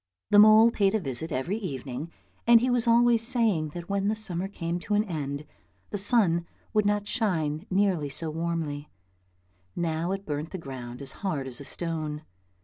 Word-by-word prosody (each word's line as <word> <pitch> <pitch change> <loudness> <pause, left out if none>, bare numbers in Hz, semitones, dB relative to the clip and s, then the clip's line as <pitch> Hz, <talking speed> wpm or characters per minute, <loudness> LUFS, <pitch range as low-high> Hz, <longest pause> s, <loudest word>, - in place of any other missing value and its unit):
The 205 - +7
mole 215 +2 +8
paid 200 -2 +1
a - - +2
visit 160 - -3
every 150 +10 -2
evening, 140 - -5 0.4
and 235 -1 +8
he 250 +2 0
was 240 -1 +2
always 235 0 +4
saying 225 -10 +1
that 175 0 -6
when 200 0 -1
the 215 - +1
summer 190 -4 -1
came 175 -3 -4
to 205 +4 -2
an 210 - +3
end, 150 -6 -4 0.5
the - - -2
sun 190 -6 +4 0.3
would 215 -2 +2
not 205 0 0
shine 170 -8 -1
nearly 185 -6 +1
so 155 +3 -2
warmly, 160 -3 -3 0.9
now 165 +1 -1
it 195 +1 -4
burnt 150 +1 -4
the 190 - -6
ground 130 -5 -8
as 135 - -3
hard 155 -9 -2
as 130 0 -5
a - - -8
stone. 155 -2 -4
175 Hz, 180 wpm, -27 LUFS, 150-210 Hz, 0.9 s, mole